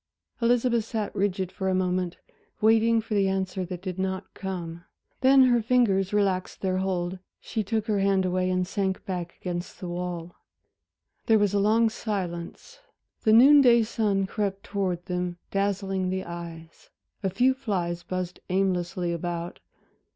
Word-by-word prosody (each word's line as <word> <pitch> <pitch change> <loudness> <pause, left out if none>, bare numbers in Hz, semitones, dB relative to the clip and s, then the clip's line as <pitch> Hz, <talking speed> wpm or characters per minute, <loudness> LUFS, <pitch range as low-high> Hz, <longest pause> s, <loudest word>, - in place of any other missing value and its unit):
Elizabeth 235 0 +2
sat 220 -3 -3
rigid 190 -2 -1
for 190 -1 -2
a 185 - +1
moment, 180 -1 -1 0.4
waiting 225 +1 +4
for 220 0 -6
the 200 -2 +3
answer 190 -1 -1
that 180 0 -7
did 185 -1 -5
not 190 0 -3
come; 175 -3 -6 0.4
then 265 0 +6
her 240 -2 +4
fingers 215 -5 +2
relaxed 195 -3 0
their 185 -1 0
hold, 185 -1 -2 0.2
she 220 -2 -3
took 220 +1 -1
her 210 -2 0
hand 195 -1 +2
away 185 0 0
and 185 0 +1
sank 190 0 -2
back 175 -2 -4
against 175 -1 -5
the 180 - -6
wall. 175 -1 -5 0.9
There 225 - +6
was 205 -2 +2
a 200 - +2
long 220 +3 +4
silence. 190 - -5 0.5
The 215 - +5
noon 280 +6 +8
day 235 -3 +6
sun 210 -3 0
crept 195 0 -3
towards 185 -4 -2
them, 180 -1 -3
dazzling 195 -1 -1
the 190 0 -2
eyes, 170 -1 -9 0.3
a 195 - 0
few 250 +8 +3
flies 185 -10 -2
buzzed 180 0 -4
aimlessly 180 -2 0
about. 170 0 -4
190 Hz, 155 wpm, -26 LUFS, 180-215 Hz, 0.9 s, noon